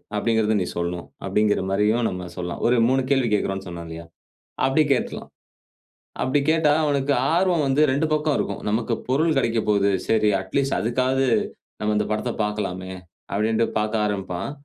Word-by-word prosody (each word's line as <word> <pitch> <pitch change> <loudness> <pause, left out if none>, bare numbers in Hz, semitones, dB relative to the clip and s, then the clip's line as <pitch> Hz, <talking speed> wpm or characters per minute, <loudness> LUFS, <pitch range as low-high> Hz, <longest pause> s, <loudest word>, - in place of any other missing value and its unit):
அப்பிடிங்கிறத 110 0 +1
நீ - - -2
சொல்லணும். 85 0 -3 0.2
அப்பிடிங்கிறமாரியும் 105 +2 +1
நம்ம 90 -1 -6
சொல்லாம். 90 -1 -4
ஒரு 125 - +3
3 130 +1 +2
கேள்வி 135 -4 +2
கேட்கிறோன்னு 95 -2 -1
சொன்னோம் 85 -1 -7
இல்லயா? 80 +1 -8 0.6
அப்பிடி 145 +4 +3
கேட்டுருலாம். 125 - -2 0.9
அப்பிடி 135 +3 +2
கேட்டா 160 -2 +3
அவனுக்கு 140 -1 +1 0.2
ஆர்வம் 175 -3 +2
வந்து 135 +2 +2
2 140 +4 +1
பக்கம் 150 -1 +1
இருக்கும். 100 - -3
நமக்கு 115 +2 0
பொருள் 155 +4 +2
கிடைக்க 115 -3 +1
போகுது. 100 -1 +3 0.2
சரி 110 -1 +3
அட் 95 - -11
லீஸ்ட் 135 0 0
அதுக்காவது 130 +3 +1 0.5
நம்ம 105 0 0
இந்த 105 - +1
படத்த 110 +3 -1
பார்க்கலாமே! 95 -3 -3 0.4
அப்பிடின்டு 110 +3 +1
பார்க்க 105 0 0
ஆரம்பிப்பான். 95 0 -3
110 Hz, 150 wpm, -23 LUFS, 100-135 Hz, 0.9 s, ஒரு